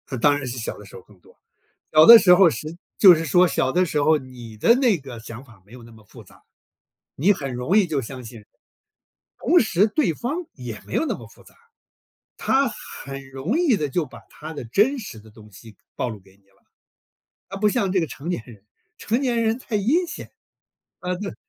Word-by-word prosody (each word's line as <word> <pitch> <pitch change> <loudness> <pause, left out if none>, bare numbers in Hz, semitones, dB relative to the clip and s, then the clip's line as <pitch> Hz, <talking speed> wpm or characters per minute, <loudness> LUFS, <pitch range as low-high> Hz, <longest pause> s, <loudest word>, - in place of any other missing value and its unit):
嗯， 130 - -5
当 145 +4 +3
然 145 - -6
是 125 +1 -6
小 115 - -5
的 105 - -13
时 - - -15
候 - - -10
更 100 0 -23
多。 - - -23 0.6
小 155 0 +7
的 235 0 +12
时 185 -3 +6
候 180 -2 +5
是 155 +2 -7 0.2
就 190 -4 +9
是 165 0 -3
说 180 +4 +4
小 130 -4 -1
的 180 +1 +2
时 150 -4 -1
候， 155 +1 +3
你 125 -4 -12
的 230 - +4
那 245 -7 +2
个 130 -5 -10
想 115 +3 -10
法 115 -7 -20
没 105 - -20
有 125 -1 -12
那 115 0 -15
么 110 -1 -18
复 - - -15
杂， - - -21 0.7
你 185 +9 +3
很 140 -8 -6
容 125 - 0
易 200 -4 +3
就 150 -4 -2
相 130 +1 -9
信。 115 -2 -12 1.0
同 350 - +3
时 205 -3 +2
对 220 - 0
方 250 - -4 0.2
也 125 -5 -8
没 - - -9
有 - - +1
那 - - -2
么 - - -11
复 - - -20
杂， - - -20 0.8
他 270 0 +1
很 135 - -10
容 140 - -2
易 320 -10 +3
地 150 -6 -2
就 160 +3 -2
把 130 - -14
他 155 +1 -10
的 145 - -7
真 210 - +1
实 200 - -9
的 110 +1 -17
东 105 0 -17
西 105 +2 -15 0.2
暴 - - -2
露 110 -3 -7
给 95 0 -23
你 - - -34
了。 100 0 -34 0.8
啊， 195 - -7
不 210 +1 +2
像 205 -4 -1
这 190 - +2
个 165 - -1
成 140 +3 -9
年 175 - -3
人， 110 -5 -15 0.3
成 230 +4 -1
年 240 -4 0
人 225 +1 0
太 245 -4 -4
阴 280 - +1
险 - - -9 0.7
啊 180 0 -3
对， 200 +2 -6
155 Hz, 245 characters per minute, -22 LUFS, -, 1.0 s, 的